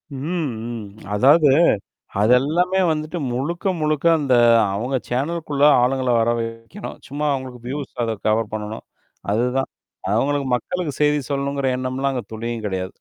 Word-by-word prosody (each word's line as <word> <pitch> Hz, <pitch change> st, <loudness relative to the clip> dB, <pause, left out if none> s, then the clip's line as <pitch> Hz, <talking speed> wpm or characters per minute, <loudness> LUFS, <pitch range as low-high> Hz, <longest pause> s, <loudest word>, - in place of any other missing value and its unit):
ம், 155 Hz, 0 st, -2 dB, 0.2 s
ம். 115 Hz, -3 st, -6 dB, 0.3 s
அதாவது. 145 Hz, +7 st, +5 dB, 0.7 s
அதெல்லாமே 155 Hz, -, +3 dB
வந்துட்டு 155 Hz, +2 st, -2 dB
முழுக்க, 145 Hz, +10 st, -3 dB, 0.2 s
முழுக்க 155 Hz, 0 st, 0 dB
அந்த 135 Hz, -4 st, +1 dB, 0.4 s
அவங்க 125 Hz, +6 st, -1 dB
சேனலுகுள்ள 145 Hz, +2 st, -2 dB, 0.2 s
ஆளுங்கள 130 Hz, 0 st, +1 dB
வர 115 Hz, +1 st, +2 dB
வைக்கணும் 115 Hz, -, -7 dB
சும்மா 145 Hz, +2 st, -2 dB
அவங்களுக்கு 130 Hz, -2 st, -5 dB
வியூஸ் 140 Hz, +2 st, -5 dB
அத 115 Hz, -, -1 dB
கவர் 110 Hz, 0 st, +1 dB
பண்ணணும். 110 Hz, 0 st, -5 dB, 0.5 s
அதுதான். 125 Hz, +4 st, 0 dB, 0.4 s
அவுங்களுக்கு 140 Hz, +4 st, +1 dB
மக்களுக்கு 170 Hz, +5 st, -2 dB
செய்தி 150 Hz, 0 st, +3 dB
சொல்லணுங்கிற 140 Hz, -1 st, -1 dB
எண்ணம்லாம் 130 Hz, +2 st, -1 dB
அங்க 120 Hz, -4 st, -3 dB
துணியும் 115 Hz, 0 st, -4 dB
கெடையாது. 95 Hz, -1 st, -2 dB
135 Hz, 130 wpm, -21 LUFS, 120-150 Hz, 0.7 s, அதாவது